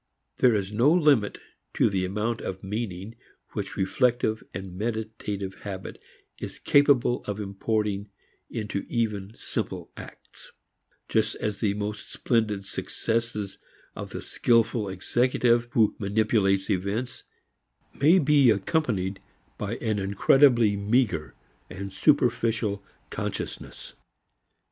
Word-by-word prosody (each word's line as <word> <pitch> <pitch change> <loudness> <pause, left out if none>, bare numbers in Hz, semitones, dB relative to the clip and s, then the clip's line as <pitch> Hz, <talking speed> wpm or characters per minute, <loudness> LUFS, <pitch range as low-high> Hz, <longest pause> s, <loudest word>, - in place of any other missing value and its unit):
There 125 -3 +5
is 100 -1 -1
no 120 +8 +4
limit 150 -11 +3 0.4
to - - +4
the 95 -2 0
amount 105 +5 -2
of 95 0 -5
meaning 100 0 -4 0.4
which - - -5
reflective 110 +2 +1
and 95 -1 -7
meditative 105 -2 -4
habit 95 -2 -7 0.4
is - - -6
capable 140 -4 +3
of 105 0 -4
importing 105 0 -2 0.4
into 105 -2 -3
even 105 -4 -1
simple - - -4
acts, - - -12 0.5
just 110 -1 +1
as 105 -2 -3
the 100 -2 +1
most 105 +1 -5
splendid 105 -5 0
successes 110 0 -3 0.4
of - - -6
the - - -6
skilful 115 -3 +2
executive 120 +4 +2
who 110 -3 +4
manipulates 100 -2 +2
events 100 +7 -2 0.7
may 160 +7 +5
be 145 -5 +5
accompanied 100 - 0 0.4
by 105 +2 -2
an 110 -4 -1
incredibly 110 +3 +4
meager 100 - 0 0.3
and 100 +1 -7
superficial 115 -4 +2 0.3
consciousness. - - -5
105 Hz, 110 wpm, -26 LUFS, 100-120 Hz, 0.7 s, There